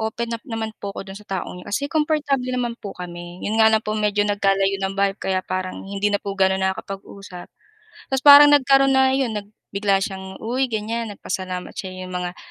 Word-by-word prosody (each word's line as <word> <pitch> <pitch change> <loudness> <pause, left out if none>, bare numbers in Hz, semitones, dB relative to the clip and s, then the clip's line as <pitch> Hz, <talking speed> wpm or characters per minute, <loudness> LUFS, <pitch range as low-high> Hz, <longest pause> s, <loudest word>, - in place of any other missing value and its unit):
open 230 +1 -3
up 230 - -6
naman 225 -1 -3
po 200 - -4
ako 195 - -6
do'n 195 - -9
sa 210 - -18
taong 185 -1 -4
'yun, - - -15
kasi 280 +7 -1
komportable 295 -4 0
naman 250 -2 -1
po 200 - -8
kami, 175 0 -8
'yon 220 +2 0
nga 220 - +7
lang 220 0 +2
po 215 - -2
medyo 210 -1 +1
nagkalayo 195 -1 +1
ng 195 0 -2
bahay 200 0 +2
kaya 190 -2 -2
parang 185 0 -3
hindi 200 +1 -1
na 205 - +2
po 200 - -4
gaano 190 -1 +2
nakakapag-usap, 190 -1 -5 0.6
ta's 265 0 -1
parang 290 0 +10
nagkaroon 275 -1 +4
na, 265 0 +4
'yon, 260 -5 0
nag 205 0 -6 0.2
bigla 200 -1 +1
siyang, 190 -2 -7
uy, 255 +3 0
ganiyan, 225 +1 -3
nagpasalamat 185 -1 -5
siya, 185 -1 -6
'yong 185 - -8
mga 180 0 -4
205 Hz, 205 wpm, -22 LUFS, 190-235 Hz, 0.6 s, parang